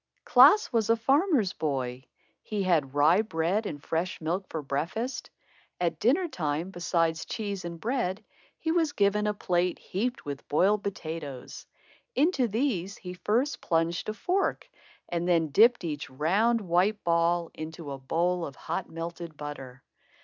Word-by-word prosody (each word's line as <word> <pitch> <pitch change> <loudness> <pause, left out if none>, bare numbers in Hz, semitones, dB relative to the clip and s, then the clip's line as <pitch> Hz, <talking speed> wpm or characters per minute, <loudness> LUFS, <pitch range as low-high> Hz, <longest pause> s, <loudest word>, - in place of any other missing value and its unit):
Klaas 280 +9 +6
was 225 -2 +1
a 230 - +6
farmer's 270 - +2
boy. 130 -4 -3 0.4
He 210 -2 -3
had 155 -7 +1
rye 155 +7 +5
bread 195 +2 -1
and 145 -1 -7
fresh 170 +3 -2
milk 175 +4 -2
for 160 -2 -4
breakfast. 170 - -3 0.5
At 170 -2 -1
dinner 320 +10 +3
time, 160 - -2
beside 170 -2 0
cheese 200 +2 -4
and 170 -1 -6
bread, 220 -3 -2 0.3
he 320 - -1
was 325 -3 +1
given 210 -1 +2
a 210 - +1
plate 180 -2 0
heaped 240 +7 -3
with 140 -1 -6
boiled 200 +7 +3
potatoes. 160 -9 -6 0.5
Into 285 -5 +3
these 205 -5 -1
he 180 -1 -7
first 235 +10 0
plunged 165 +3 0
a 215 - -3
fork 375 - -1 0.4
and 175 0 -2
then 165 -3 +3
dipped 225 - +5
each 155 -3 -4
round, 200 - +2
white 190 +3 +1
ball 170 0 +2
into 155 -1 -7
a 135 - -6
bowl 170 +6 0
of 140 -4 -6
hot 170 +5 -4
melted 165 -1 -6
butter. 135 -3 -8
175 Hz, 150 wpm, -28 LUFS, 160-215 Hz, 0.5 s, Klaas